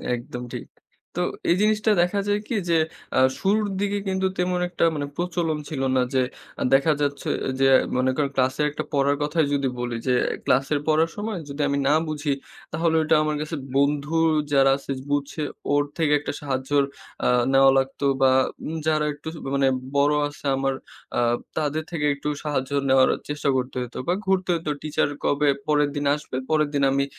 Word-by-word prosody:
একদম 120 Hz, +1 st, -7 dB
ঠিক। -, -, -5 dB, 0.5 s
তো -, -, +1 dB, 0.3 s
এই 170 Hz, -, +5 dB
জিনিসটা 215 Hz, +1 st, +3 dB
দেখা 180 Hz, +4 st, +1 dB
যায় 205 Hz, 0 st, +2 dB
কি 235 Hz, -, -2 dB
যে 170 Hz, -, +4 dB, 0.4 s
অ্যা -, -, +3 dB, 0.2 s
শুরুর 210 Hz, +2 st, +2 dB
দিকে 205 Hz, 0 st, 0 dB
কিন্তু 190 Hz, 0 st, +1 dB
তেমন 180 Hz, 0 st, 0 dB
একটা 175 Hz, -, -2 dB
মানে 145 Hz, -1 st, -2 dB
প্রচলন 170 Hz, -2 st, -1 dB
ছিল 140 Hz, -4 st, -3 dB
না 130 Hz, -, +4 dB
যে 130 Hz, -, +3 dB, 0.4 s
আ -, -, +2 dB
দেখা 140 Hz, +4 st, +5 dB
যাচ্ছে 140 Hz, -1 st, -1 dB, 0.3 s
যে 135 Hz, -, +4 dB, 0.3 s
মনে 130 Hz, +1 st, +2 dB
করেন 145 Hz, -1 st, 0 dB
ক্লাসের 130 Hz, +3 st, +1 dB
একটা -, -, -4 dB
পড়ার 140 Hz, 0 st, +3 dB
কথাই 155 Hz, +1 st, +1 dB
যদি 140 Hz, -1 st, +1 dB
বলি 120 Hz, -1 st, -3 dB
যে 125 Hz, -, +3 dB, 0.3 s
ক্লাসের 135 Hz, +3 st, +2 dB
পড়ার 160 Hz, +1 st, +3 dB
সময় 210 Hz, -2 st, -3 dB
যদি 140 Hz, +2 st, -4 dB
আমি 140 Hz, -, 0 dB
না 145 Hz, -, +4 dB
বুঝি 150 Hz, -2 st, -1 dB, 0.4 s
তাহলে 160 Hz, +1 st, +1 dB
ওইটা 155 Hz, -, +3 dB
আমার 150 Hz, 0 st, -1 dB
কাছে 155 Hz, +2 st, -4 dB, 0.2 s
বন্ধু 145 Hz, +2 st, +1 dB, 0.4 s
যারা 135 Hz, -1 st, +5 dB
আছে 140 Hz, -, -7 dB, 0.2 s
বুঝছে 145 Hz, +2 st, -1 dB, 0.3 s
ওর 145 Hz, -, +4 dB
থেকে 160 Hz, -3 st, +1 dB
একটা 145 Hz, -, -4 dB
সাহায্য 130 Hz, -2 st, -3 dB, 0.5 s
অ্যা -, -, +2 dB, 0.2 s
নেওয়া 135 Hz, 0 st, +7 dB
লাগতো 135 Hz, +1 st, -1 dB, 0.2 s
বা 130 Hz, -1 st, +6 dB, 0.6 s
যারা 155 Hz, -1 st, +2 dB
একটু 145 Hz, +2 st, -13 dB, 0.3 s
মানে 135 Hz, -1 st, +3 dB, 0.3 s
বড়ো 145 Hz, +1 st, +3 dB
আছে 145 Hz, 0 st, -13 dB
আমার 135 Hz, 0 st, 0 dB, 0.4 s
অ্যা -, -, +1 dB, 0.4 s
তাদের 155 Hz, 0 st, -1 dB
থেকে 150 Hz, -3 st, -1 dB
একটু 140 Hz, +1 st, -6 dB, 0.2 s
সাহায্য 145 Hz, -3 st, -2 dB, 0.2 s
নেওয়ার 130 Hz, 0 st, +5 dB, 0.2 s
চেষ্টা 145 Hz, -1 st, -1 dB
করতে 130 Hz, 0 st, -3 dB
হইতো 125 Hz, -1 st, -6 dB
বা 175 Hz, -, +3 dB
ঘুরতে 190 Hz, -1 st, +1 dB
হইতো 165 Hz, -3 st, -2 dB
teacher 150 Hz, -1 st, 0 dB
কবে 145 Hz, +1 st, +2 dB, 0.2 s
পরের 150 Hz, -1 st, +3 dB
দিন 145 Hz, 0 st, -2 dB
আসবে 150 Hz, -3 st, -6 dB
পরের 155 Hz, -2 st, +2 dB
দিন 140 Hz, -1 st, +1 dB
আমি 140 Hz, 0 st, +1 dB
145 Hz, 180 wpm, -24 LUFS, 140-165 Hz, 0.6 s, নেওয়া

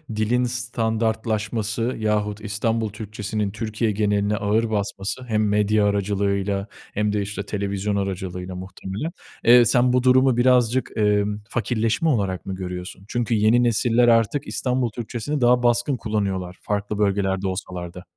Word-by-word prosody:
dilin 115 Hz, +4 st, +1 dB
standartlaşması 110 Hz, -2 st, -1 dB, 0.2 s
yahut 105 Hz, -1 st, -1 dB
İstanbul 110 Hz, +1 st, -1 dB
Türkçesinin 105 Hz, -1 st, -4 dB
Türkiye 110 Hz, 0 st, -2 dB
geneline 105 Hz, 0 st, +1 dB
ağır 110 Hz, +3 st, +1 dB
basması 100 Hz, +3 st, -2 dB
hem 110 Hz, -2 st, +1 dB
medya 105 Hz, 0 st, +2 dB
aracılığıyla 100 Hz, 0 st, 0 dB, 0.3 s
hem 105 Hz, 0 st, 0 dB
de 105 Hz, -, 0 dB
işte 100 Hz, 0 st, -4 dB
televizyon 100 Hz, 0 st, -2 dB
aracılığıyla 95 Hz, -2 st, -4 dB
muhtemelen. 95 Hz, -, -6 dB, 0.3 s
Eee, 120 Hz, +1 st, +7 dB
sen 125 Hz, +1 st, +3 dB
bu 125 Hz, 0 st, +2 dB
durumu 130 Hz, -1 st, +4 dB
birazcık, 125 Hz, 0 st, +3 dB
emm, 105 Hz, -1 st, +1 dB
fakirleşme 115 Hz, +7 st, 0 dB
olarak 100 Hz, -, -1 dB
mı 95 Hz, -, -4 dB
görüyorsun? 90 Hz, +1 st, -7 dB
Çünkü 120 Hz, 0 st, -1 dB
yeni 110 Hz, +3 st, +4 dB
nesiller 120 Hz, +1 st, +3 dB
artık 115 Hz, +4 st, +2 dB
İstanbul 125 Hz, -1 st, 0 dB
Türkçesini 120 Hz, +5 st, -4 dB
daha 120 Hz, 0 st, +4 dB
baskın 120 Hz, +3 st, +2 dB
kullanıyorlar 95 Hz, -5 st, -2 dB
farklı 105 Hz, 0 st, -2 dB
bölgelerde 100 Hz, -2 st, +1 dB
olsalar 90 Hz, -2 st, -5 dB
da. 90 Hz, -, -10 dB
105 Hz, 135 wpm, -23 LUFS, 100-120 Hz, 0.3 s, Eee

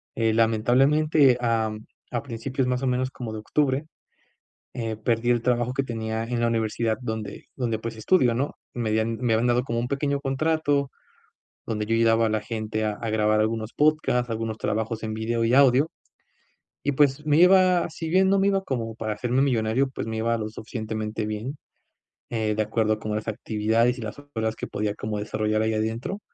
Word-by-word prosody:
Eh, 115 Hz, -1 st, +1 dB
lamentablemente, 130 Hz, +5 st, +4 dB
am, 110 Hz, -2 st, -1 dB, 0.3 s
a 120 Hz, -, -2 dB
principios 130 Hz, +1 st, -3 dB
más 125 Hz, +1 st, -1 dB
o -, -, +1 dB
menos 130 Hz, +1 st, 0 dB
como 120 Hz, -5 st, -6 dB
de 110 Hz, -, -5 dB
Octubre. 140 Hz, +5 st, 0 dB, 0.9 s
Eh, 115 Hz, -2 st, -3 dB
perdí 115 Hz, +2 st, 0 dB
el 120 Hz, -1 st, +3 dB
trabajo 120 Hz, 0 st, +1 dB
que 135 Hz, -, 0 dB
tenía 110 Hz, -3 st, -3 dB
en 120 Hz, +1 st, -2 dB
la 120 Hz, -, +2 dB
universidad 115 Hz, -1 st, 0 dB
donde 110 Hz, -4 st, -5 dB
donde 120 Hz, -4 st, -1 dB
pues, 115 Hz, +1 st, -6 dB
estudio, 120 Hz, +1 st, +3 dB
¿no?, 135 Hz, +5 st, -1 dB, 0.2 s
me 115 Hz, -3 st, -2 dB
habían 110 Hz, +1 st, 0 dB
me 120 Hz, -1 st, 0 dB
habían 115 Hz, +2 st, +2 dB
dado 120 Hz, +1 st, +2 dB
como 115 Hz, -2 st, -2 dB
un 120 Hz, +1 st, -1 dB
pequeño 140 Hz, +1 st, -1 dB
contrato 145 Hz, 0 st, 0 dB, 0.8 s
donde 105 Hz, -2 st, -2 dB
yo 115 Hz, -, -1 dB
ayudaba 115 Hz, 0 st, +4 dB
a -, -, -1 dB
la 110 Hz, 0 st, +1 dB
gente 110 Hz, -1 st, -3 dB
a 105 Hz, -, 0 dB
a 115 Hz, +2 st, -5 dB
grabar 110 Hz, 0 st, +2 dB
algunos 110 Hz, +1 st, -2 dB
podcasts, 140 Hz, -5 st, +2 dB
algunos 110 Hz, -1 st, -3 dB
trabajos 110 Hz, +1 st, -2 dB
en 110 Hz, -1 st, -3 dB
vídeo 115 Hz, +1 st, -1 dB
y 115 Hz, +1 st, +2 dB
audio. 140 Hz, +3 st, +5 dB, 0.9 s
Y 145 Hz, -, +1 dB
pues, 145 Hz, +1 st, +2 dB
me 150 Hz, 0 st, +4 dB
iba, 180 Hz, 0 st, +5 dB
si 160 Hz, +1 st, -5 dB
bien 190 Hz, +2 st, +4 dB
no 195 Hz, +1 st, +3 dB
me 195 Hz, +1 st, +3 dB
iba 195 Hz, -1 st, +1 dB
como 115 Hz, -9 st, -3 dB
para 110 Hz, -1 st, -3 dB
hacerme 125 Hz, +4 st, 0 dB
millonario, 125 Hz, 0 st, +1 dB
pues, 130 Hz, -, -5 dB
me 110 Hz, 0 st, -3 dB
iba 115 Hz, +1 st, +1 dB
lo 110 Hz, -1 st, -3 dB
suficientemente 110 Hz, 0 st, -4 dB
bien. 110 Hz, +7 st, -4 dB, 0.7 s
Eh, 110 Hz, -2 st, 0 dB
de 110 Hz, -, +1 dB
acuerdo 110 Hz, 0 st, 0 dB
con 110 Hz, -1 st, -3 dB
las 105 Hz, 0 st, -3 dB
actividades, 110 Hz, +2 st, 0 dB
y -, -, -7 dB
las 110 Hz, -1 st, -5 dB, 0.2 s
horas 110 Hz, -1 st, -1 dB
que -, -, -5 dB
podía 105 Hz, 0 st, -2 dB
como 105 Hz, 0 st, -4 dB
desarrollar 110 Hz, +1 st, -1 dB
ahí 110 Hz, 0 st, +1 dB
adentro. 115 Hz, -, -2 dB
115 Hz, 195 wpm, -25 LUFS, 110-130 Hz, 0.9 s, audio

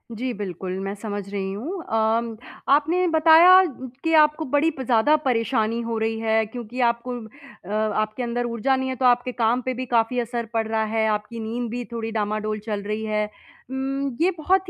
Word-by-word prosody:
जी, 250 Hz, +3 st, -3 dB
बिल्कुल, 185 Hz, -2 st, -5 dB
मैं 195 Hz, +1 st, -3 dB
समझ 205 Hz, -2 st, -5 dB
रही 195 Hz, -1 st, -3 dB
हूँ। 330 Hz, -, -5 dB
अम, 225 Hz, +1 st, 0 dB, 0.3 s
आपने 325 Hz, +6 st, +3 dB
बताया 330 Hz, +3 st, +7 dB, 0.4 s
कि 325 Hz, 0 st, +1 dB
आपको 305 Hz, +1 st, +3 dB
बड़ी 290 Hz, +3 st, +3 dB
प 265 Hz, -3 st, -7 dB
ज़्यादा 245 Hz, +5 st, +4 dB
परेशानी 230 Hz, -2 st, +1 dB
हो 230 Hz, -1 st, -3 dB
रही 225 Hz, 0 st, -1 dB
है 220 Hz, 0 st, +2 dB
क्योंकि 240 Hz, +2 st, -8 dB
आपको 235 Hz, +2 st, -2 dB, 0.5 s
अ, -, -, -10 dB, 0.3 s
आपके 215 Hz, +3 st, -3 dB
अंदर 240 Hz, 0 st, -2 dB
ऊर्जा 240 Hz, +3 st, 0 dB
नहीं 260 Hz, 0 st, -2 dB
है 260 Hz, -, -2 dB
तो 255 Hz, -, -1 dB
आपके 245 Hz, 0 st, +3 dB
काम 240 Hz, +1 st, +1 dB
पे 255 Hz, +1 st, -2 dB
भी 255 Hz, +1 st, -4 dB
काफ़ी 240 Hz, +1 st, +1 dB
असर 235 Hz, 0 st, -3 dB
पड़ 225 Hz, -1 st, 0 dB
रहा 220 Hz, 0 st, 0 dB
है। 220 Hz, 0 st, +2 dB
आपकी 210 Hz, +2 st, -3 dB
नींद 230 Hz, +1 st, -3 dB
भी 245 Hz, 0 st, -3 dB
थोड़ी 225 Hz, -1 st, -4 dB
डामाडोल 215 Hz, 0 st, -2 dB
चल 210 Hz, -2 st, -2 dB
रही 215 Hz, +1 st, -3 dB
है। 210 Hz, 0 st, 0 dB, 0.5 s
उम, 270 Hz, 0 st, -2 dB
ये 370 Hz, +2 st, +4 dB
बहुत 370 Hz, +4 st, +1 dB
235 Hz, 190 wpm, -23 LUFS, 220-265 Hz, 0.5 s, बताया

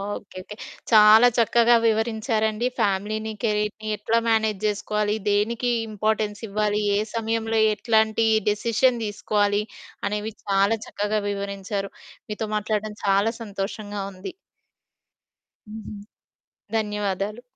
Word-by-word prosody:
Okay. 200 Hz, -1 st, -6 dB
Okay. 210 Hz, -, -10 dB, 0.4 s
చాలా 215 Hz, +2 st, +8 dB
చక్కగా 235 Hz, +1 st, +5 dB
వివరించారండి. 220 Hz, 0 st, 0 dB
ఫ్యామిలీని, 215 Hz, +1 st, -1 dB
కెరీర్‌ని 210 Hz, -1 st, -1 dB
ఎట్లా 220 Hz, +3 st, +1 dB
మేనేజ్ 220 Hz, -3 st, +1 dB
జేసుకోవాలి? 210 Hz, 0 st, -1 dB, 0.2 s
దేనికి 230 Hz, +4 st, +1 dB, 0.2 s
ఇంపార్టెన్స్ 215 Hz, 0 st, -1 dB
ఇవ్వాలి? 210 Hz, +1 st, 0 dB, 0.2 s
ఏ -, -, +2 dB, 0.2 s
సమయంలో 225 Hz, 0 st, -1 dB, 0.2 s
ఎట్లాంటి 220 Hz, 0 st, +2 dB, 0.2 s
డెసిషన్ 230 Hz, +3 st, +1 dB
దీసుకోవాలి? 205 Hz, 0 st, 0 dB, 0.4 s
అనేవి 210 Hz, +2 st, -3 dB
చాలా 200 Hz, +2 st, +2 dB
చక్కగా 210 Hz, +1 st, -1 dB
వివరించారు. 200 Hz, 0 st, -4 dB, 0.4 s
మీతో 215 Hz, +1 st, -3 dB
మాట్లాడ్డం 210 Hz, 0 st, -2 dB
చాలా 200 Hz, +3 st, +2 dB
సంతోషంగా 205 Hz, 0 st, -5 dB
ఉంది. 185 Hz, -, -8 dB, 1.4 s
హుహు. 215 Hz, 0 st, -8 dB, 0.8 s
ధన్యవాదాలు. 210 Hz, 0 st, -2 dB
210 Hz, 100 wpm, -24 LUFS, 205-220 Hz, 1.4 s, చాలా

